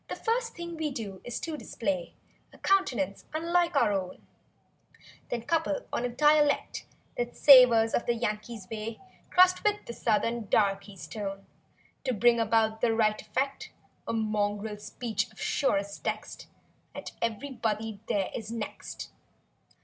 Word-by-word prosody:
First 465 0 0
thing 340 -1 -6
we 315 -1 -1
do 205 -8 -6
is 245 - -4
to 325 -1 -3
display 195 - -3 0.4
A - - -16
countenance 240 - +1
unlike 340 +1 +1
our 235 -7 +4
own; 185 -2 -4 1.0
Then 235 -2 -3
couple 315 0 0
on - - 0
a - - -1
dialect 295 +3 +2 0.3
That 240 0 -2
savors 245 -5 +8
of - - 0
the 240 - +2
yankee's 215 -2 -4
way. 220 +1 -5 0.3
Crossed 365 0 +5
with 420 0 +1
the 235 - -6
southern 230 0 0
darkey's 195 -2 0
tone, 195 -3 -6 0.6
89 - - -45
To 255 - +1
bring 235 +3 +4
about 220 0 +2
the 230 -2 +3
right 215 -1 +2
effect— 275 +1 -2 0.4
A - - -1
mongrel 210 -1 -1
speech 225 +1 -3
of - - -18
surest 200 -7 0
text. - - -4 0.5
(And - - -6
everybody 225 -3 -2
there 195 -2 0
is 220 -1 -5
next). 230 -2 -6
230 Hz, 140 wpm, -29 LUFS, 210-280 Hz, 1.0 s, savors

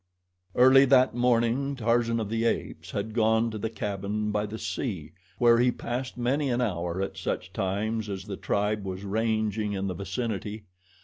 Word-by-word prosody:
Early 130 +2 +7
that 130 -1 +5
morning, 120 +3 +1
Tarzan 115 -1 +1
of 110 - -2
the 115 +1 -1
Apes 115 - -2
had 110 - -3
gone 110 0 +2
to 110 - -5
the 110 - -2
cabin 105 0 -3
by 105 0 -1
the 110 +2 -6
sea, 95 - -4 0.3
where 120 0 +5
he 125 +1 +4
passed 125 +2 -4
many 135 +4 0
an 120 0 +1
hour 90 -5 -1
at 95 - -5
such 95 - -3
times 105 +2 -1
as 95 -1 -4
the 100 0 -6
tribe 105 +2 -1
was 95 0 -5
ranging 110 0 0
in 95 0 -2
the 95 - -2
vicinity. 105 +2 -4
110 Hz, 175 wpm, -27 LUFS, 100-120 Hz, 0.3 s, Early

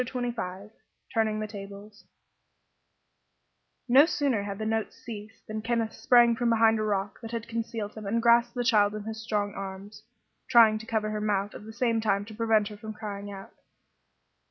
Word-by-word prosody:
CHAPTER 250 +1 -5
XXV 200 -2 -6 0.4
TURNING 220 -2 +1
THE 215 - -3
TABLES 205 0 -10 1.8
No 270 +5 +7
sooner 275 -10 0
had 200 -1 -5
the 215 - -4
notes 220 0 -1
ceased 220 -3 -10
than 215 0 -5
Kenneth 230 -1 -1
sprang 240 -1 +5
from 240 +1 0
behind 225 -1 +4
a - - 0
rock 200 -2 -2
that 225 - -7
had 230 0 -5
concealed 230 -2 -4
him 215 -2 -8
and 230 +4 +1
grasped 235 +1 +4
the 245 - -1
child 210 -4 +3
in 210 - -5
his 220 +1 -6
strong 205 -3 -1
arms, 195 +2 -8 0.5
trying 225 -3 +6
to 220 - -11
cover 215 -1 -1
her 210 0 -3
mouth 205 -1 0
at - - -10
the - - -7
same 230 -1 0
time 200 -2 +1
to 220 - -10
prevent 220 -1 +2
her 210 - -10
from 215 +1 -7
crying 205 -1 -6
out. 195 -1 -10
215 Hz, 185 wpm, -28 LUFS, 205-230 Hz, 1.8 s, No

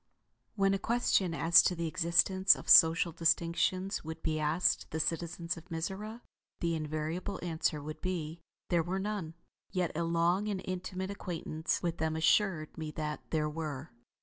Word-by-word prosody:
When 195 -1 +2
a 195 - 0
question 200 -6 +1
as 170 +2 +6
to 180 - +1
the 170 0 -3
existence 185 +4 +3
of - - -11
social 165 +1 +7
distinctions 170 +4 0
would 160 0 -8
be 155 -1 -1
asked 160 +4 +1
the 160 - -4
citizens 170 +2 -2
of 165 +3 -13
Mizora, 195 +7 -5 0.4
the 170 -1 0
invariable 155 +5 -3
answer 160 -3 -1
would 155 +1 -7
be 170 -3 -4 0.3
there 170 -1 +3
were 180 +4 -3
none; 195 -5 -4 0.3
yet 180 -3 -1
a 170 - -1
long 170 +4 +1
and 200 -3 -2
intimate 185 +1 -4
acquaintance 165 -4 -3
with 170 -1 -2
them 160 0 -1
assured 160 0 +1
me 155 -1 -4
that 150 -1 -4
there 155 -1 0
were. 150 -3 -5
170 Hz, 160 wpm, -31 LUFS, 160-185 Hz, 0.4 s, social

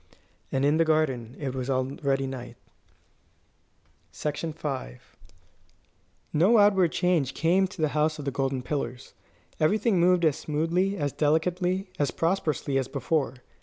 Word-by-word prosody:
And 135 +1 +1
in 145 +2 +3
the 165 - +4
garden 135 -7 0
it 135 -3 -4
was 130 0 -4
already 135 +1 0
night. 130 -2 -7 1.6
V 150 +2 -3 1.8
No 185 +10 +5
outward 195 -5 +4
change 175 -7 +1
came 180 +4 +3
to 180 - -13
the 155 - +3
House 155 +1 0
of 145 - -7
the 140 - -1
Golden 135 -1 -1
Pillars. 125 -3 -4 0.5
Everything 205 +5 +2
moved 175 0 +4
as 155 -2 +2
smoothly, 165 +6 0
as 145 -3 -2
delicately, 180 +5 0
as 145 - +2
prosperously, 155 -6 0
as 130 - -2
before. 140 +1 -1
155 Hz, 130 wpm, -27 LUFS, 135-175 Hz, 1.8 s, No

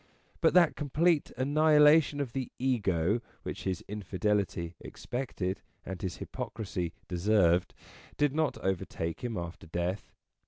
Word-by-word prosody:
But - - +4
that 175 -3 +6
complete 155 +2 +1
annihilation 150 +2 +5
of 130 -5 -3
the 130 -2 -3
Ego, 105 -5 +1 0.2
which - - -6
his 95 -2 -2
infidelity 100 -3 -1
expected 110 -7 -4 0.2
and 95 -1 -6
his 90 -2 -3
hypocrisy 95 -6 -4 0.2
deserved, 90 -1 +2 0.4
did 145 -2 +2
not 155 -2 0
overtake 85 -2 -2
him 120 -3 -2
after 85 -1 -6
death. 85 +4 -3
105 Hz, 120 wpm, -30 LUFS, 90-140 Hz, 0.4 s, that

